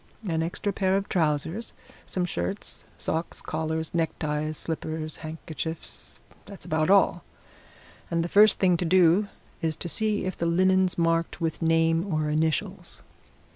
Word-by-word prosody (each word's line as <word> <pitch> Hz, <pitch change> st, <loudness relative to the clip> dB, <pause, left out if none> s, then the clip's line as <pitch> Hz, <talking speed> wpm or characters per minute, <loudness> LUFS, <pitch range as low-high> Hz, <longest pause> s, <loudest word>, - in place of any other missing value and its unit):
An 160 Hz, -2 st, 0 dB
extra 175 Hz, +4 st, -2 dB
pair 190 Hz, 0 st, +2 dB
of 200 Hz, -, -3 dB
trousers 160 Hz, +5 st, -1 dB, 0.3 s
some 180 Hz, -1 st, -1 dB
shirts 195 Hz, +3 st, -4 dB
socks 160 Hz, +2 st, -3 dB
collars 160 Hz, 0 st, -3 dB
neckties 155 Hz, -2 st, -1 dB
slippers 160 Hz, -1 st, -4 dB
handkerchiefs 160 Hz, 0 st, -7 dB, 0.2 s
that's 200 Hz, -, -11 dB
about 155 Hz, +1 st, 0 dB
all. 200 Hz, 0 st, +4 dB, 0.9 s
And 170 Hz, -1 st, +1 dB
the -, -, -2 dB
first 210 Hz, +4 st, +6 dB
thing 180 Hz, -2 st, +3 dB
to 175 Hz, -, -1 dB
do 180 Hz, +3 st, +4 dB, 0.3 s
is 160 Hz, -2 st, 0 dB
to 175 Hz, -, -4 dB
see 210 Hz, +4 st, 0 dB
if 185 Hz, -, -2 dB
the 170 Hz, -, -1 dB
linen's 185 Hz, +2 st, +3 dB
marked 165 Hz, 0 st, +1 dB
with 165 Hz, -1 st, -2 dB
name 165 Hz, +3 st, +2 dB
or 155 Hz, -1 st, 0 dB
initials." 155 Hz, 0 st, -2 dB
165 Hz, 140 wpm, -26 LUFS, 160-185 Hz, 0.9 s, first